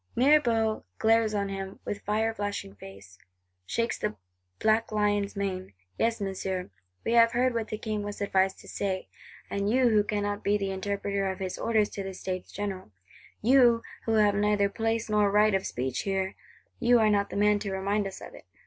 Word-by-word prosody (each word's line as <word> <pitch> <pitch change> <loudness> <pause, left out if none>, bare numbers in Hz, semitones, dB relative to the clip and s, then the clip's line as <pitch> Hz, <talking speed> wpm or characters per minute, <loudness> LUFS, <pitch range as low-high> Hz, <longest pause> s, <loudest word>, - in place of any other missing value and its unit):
'—Mirabeau 235 -5 +3
glares 225 -1 +3
on 200 -1 -1
him 195 0 -6
with 205 - -4
fire 220 +2 0
flashing 205 - -4
face; 95 -2 -13 0.5
shakes 230 - -1
the - - -2 0.4
black 220 +1 +2
lion's 205 -1 0
mane: 190 - -3 0.3
'Yes, 230 0 +1
Monsieur, 190 - -3 0.3
we - - 0
have 230 0 +5
heard 250 +1 +2
what 230 -2 -2
the 215 - -4
King 215 -1 -3
was 205 0 -6
advised 190 -1 +1
to - - -15
say: 190 -2 -3 0.4
and 200 0 -1
you 250 +1 +4
who 210 -2 +4
cannot 205 0 -2
be 205 +1 +2
the 195 -1 -2
interpreter 200 0 -2
of 190 - -4
his 185 -1 -4
orders 220 -2 +1
to 200 - -5
the 190 -1 -6
States 185 0 -5
General; 195 - -5 0.5
you, 240 -1 +5 0.2
who 225 - +1
have 210 -2 +4
neither 205 0 +2
place 225 +1 -1
nor 210 -1 +3
right 210 +1 +4
of 195 0 0
speech 130 +1 -3
here; 190 -1 -1 0.5
you 245 -1 +5
are 215 -2 +4
not 200 -1 +1
the - - -5
man 210 0 +3
to 200 -1 -4
remind 200 +2 0
us 190 - -9
of - - -10
it. - - -13
205 Hz, 190 wpm, -28 LUFS, 195-220 Hz, 0.5 s, have